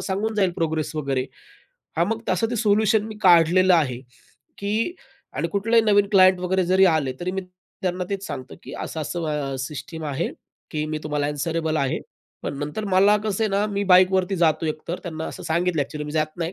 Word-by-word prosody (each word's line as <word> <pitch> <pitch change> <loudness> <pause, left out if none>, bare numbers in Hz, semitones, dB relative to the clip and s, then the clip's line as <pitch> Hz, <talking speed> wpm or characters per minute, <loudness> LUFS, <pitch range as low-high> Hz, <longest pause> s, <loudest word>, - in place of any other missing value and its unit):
सांगून 210 +3 -2
जाईल 195 -3 +2
प्रोग्रेस 160 -2 -2
वगैरे. 135 -3 -1 0.7
हां, 170 - +3
मग 225 +1 -2
तसं 185 +5 +1
ते - - -1
सोल्युशन 215 -1 +3
मी 220 - -8
काढलेलं 180 +1 +5
आहे. 140 -8 +2 0.6
की 215 - -1 0.4
आणि - - -2
कुठलाही 225 +3 +2
नवीन 205 -2 +3
क्लायंट 185 -2 +6
वगैरे 185 +1 +1
जरी 190 +2 +5
आले, 140 -5 0
तरी 180 +1 -2
मी 190 - -2 0.4
त्यांना 180 0 -1
तेच 195 -1 -3
सांगतो 130 -3 -7
की - - -10
असं-असं 150 -3 -3
सिस्टम 155 +4 -6
आहे, 145 +2 -2 0.4
की 150 -1 -2
मी 155 0 -3
तुम्हाला 150 -1 -1
आन्सरेबल 160 +2 -1
आहे. 135 -3 0 0.4
पण 140 - -4
नंतर 150 +9 -4
मला 195 +2 +4
कसं 215 0 -1
आहे - - +1
ना, 200 +2 +1
मी 200 0 -1
बाईकवरती 185 +1 +4
जातो 160 -2 +2
एकतर 155 +3 -4
त्यांना 160 -2 -5
असं - - -8
सांगितलं 170 0 0
आहे, 140 - +2
अ‍ॅक्चुअली 150 +2 -6
मी 150 - -6
जात 155 0 -1
नाही. 170 0 -3
175 Hz, 190 wpm, -23 LUFS, 155-195 Hz, 0.7 s, क्लायंट